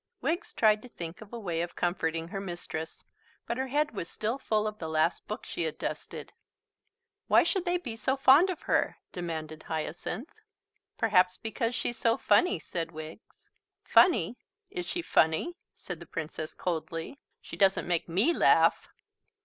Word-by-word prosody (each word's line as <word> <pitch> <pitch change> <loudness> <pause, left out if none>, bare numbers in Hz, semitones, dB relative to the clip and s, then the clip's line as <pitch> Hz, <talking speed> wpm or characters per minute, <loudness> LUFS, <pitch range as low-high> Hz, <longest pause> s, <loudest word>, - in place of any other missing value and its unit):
Wiggs 345 +6 -1
tried 215 -1 +4
to 250 - -12
think 170 -3 -7
of 215 - -12
a 235 - -5
way 175 -7 -2
of 175 0 -4
comforting 165 -2 -1
her 195 0 -4
mistress, 175 -3 -6 0.4
but 235 - -2
her 265 0 -1
head 295 +3 +1
was 195 -6 -5
still 225 +5 -2
full 215 -4 0
of 215 0 -4
the 160 - -4
last 160 +2 +1
book - - -5
she - - -4
had - - -1
dusted. - - -5 0.9
"Why - - +6
should 380 -3 0
they 355 0 +2
be 245 -11 -6
so 265 +4 0
fond 275 +7 +7
of 360 - -4
her?" - - +1
demanded 160 -3 -5
Hyacinth. 175 - -4 0.6
"Perhaps 185 -4 +3
because 230 +2 -2
she's 240 - -2
so 230 0 +3
funny," 360 - +3
said 165 +1 -4
Wiggs. 155 +5 -10 0.4
"Funny! 240 - +4 0.3
Is 360 -3 -4
she 345 -1 -2
funny?" 160 - +2 0.2
said 180 -3 -7
the 170 - -11
Princess 155 -1 -5
coldly. 165 - -3 0.2
"She - - -9
doesn't 195 -2 +3
make 175 -1 0
me 200 - +3
laugh." - - +4
195 Hz, 165 wpm, -29 LUFS, 165-250 Hz, 0.9 s, fond